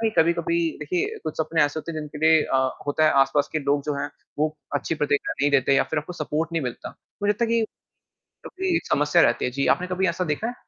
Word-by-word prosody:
कि 225 - +2
कभी-कभी, 170 0 +2 0.2
देखिए, 165 +4 -2
कुछ 155 - -4
सपने 160 0 +2
ऐसे 145 +2 0
होते 165 +1 -6
हैं, 155 - -4
जिनके 150 0 -8
लिए 160 -1 +6
अ, 135 - 0 0.3
होता 145 +2 +2
है, 155 - +5
आसपास 135 +1 +2
के 155 - 0
लोग 140 0 0
जो 150 - -1
हैं, 145 - -2 0.3
वो 155 +1 0 0.2
अच्छी 145 +3 -1
प्रतिक्रिया 145 -2 0
नहीं 145 - +3
देते 135 -1 +3
या 135 - +4
फिर 155 - +2
आपको 150 +4 -5
सपोर्ट 160 0 -3
नहीं 165 -2 0
मिलता। 125 -2 -5 0.3
मुझे 205 - +3
लगता 210 +3 +1
है - - -2
कि 230 0 +3 0.9
क्योंकि 375 -2 -1
समस्या 150 +1 +3
रहती 120 - +2
है। 125 - -1
जी, 140 +2 -1
आपने 180 - -6
कभी 185 +1 0
ऐसा 170 +2 -1
देखा 215 +10 -4
है? 245 - -3
155 Hz, 240 wpm, -24 LUFS, 145-170 Hz, 0.9 s, लिए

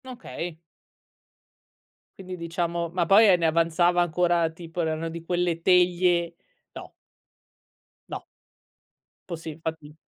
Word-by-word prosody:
Okay. 175 -9 -7 1.6
Quindi 185 -1 -7
diciamo 170 0 -3
ma 175 0 0
poi 205 +5 +6
e 180 - +6
ne 170 - -1
avanzava 170 +2 +2
ancora 175 -1 +2
tipo 165 +1 -6
erano 160 0 -2
di 165 0 -8
quelle 175 -1 -1
teglie 175 -1 +3 0.4
no. - - -10 1.2
No. - - -6 1.1
Posi 165 -2 -6
infatti. 155 -1 -7
170 Hz, 105 wpm, -25 LUFS, 165-180 Hz, 1.6 s, poi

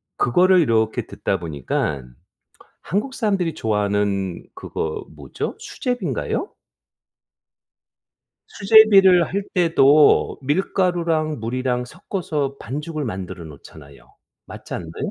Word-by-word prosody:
그거를 180 +8 +4
이렇게 110 -6 +1
듣다 - - -2
보니깐 70 -4 -4 0.7
한국 210 - -2
사람들이 195 - -1
좋아하는 100 - -1
그거 80 -1 -5
뭐죠, 70 -3 -6
수제비인가요? 205 - -3 2.0
수제비를 195 -4 +6
할 200 +1 -2
때도 155 -5 +4
밀가루랑 165 - 0
물이랑 125 +2 -2
섞어서 150 -3 -4
반죽을 150 +4 -5
만들어 95 -6 -6
놓잖아요. 70 -2 -14 0.3
맞지 - - -9
않나요? 85 -1 -5
140 Hz, 250 characters per minute, -21 LUFS, -, 2.0 s, 수제비를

